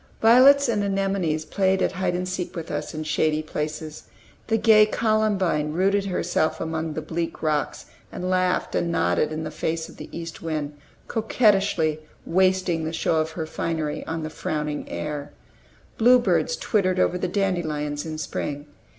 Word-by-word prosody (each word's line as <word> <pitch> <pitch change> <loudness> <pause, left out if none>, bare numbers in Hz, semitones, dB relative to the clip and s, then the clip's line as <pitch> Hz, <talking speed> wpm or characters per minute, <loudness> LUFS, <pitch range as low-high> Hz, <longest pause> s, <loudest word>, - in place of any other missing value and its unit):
Violets 265 +5 +7
and 210 -3 +1
anemones 195 -6 0
played 190 +1 +1
at - - +1
hide 185 -1 -1
and 180 +1 -2
seek 185 0 -4
with 165 -2 -6
us - - -4
in 155 - -3
shady 155 0 0
places. 155 0 -5 0.4
The 225 - +2
gay 215 -1 +6
columbine 205 -9 +1
rooted 195 +3 +2
herself 180 -4 0
among 160 -1 -3
the 155 - -4
bleak 165 +2 -4
rocks, 155 -2 -1 0.3
and 180 - -4
laughed 185 0 +1
and 170 - 0
nodded 90 - +1
in 155 +1 -3
the 155 - -5
face 160 +1 -3
of - - -14
the - - -9
east 165 -1 -7
wind, 150 -3 -3 0.3
coquettishly 200 -8 +2 0.3
wasting 185 -2 +2
the 160 +1 -3
show 165 0 +1
of 160 +1 -1
her 160 -1 -3
finery 155 -1 -3
on 160 0 -3
the 155 - -5
frowning 150 -1 -3
air. 145 -1 -5 0.7
Bluebirds 250 - +4
twittered 185 -4 +1
over 180 - +2
the 185 - -1
dandelions 160 -7 -1
in 155 -1 -5
spring. 145 -1 -4
165 Hz, 160 wpm, -24 LUFS, 155-195 Hz, 0.7 s, Violets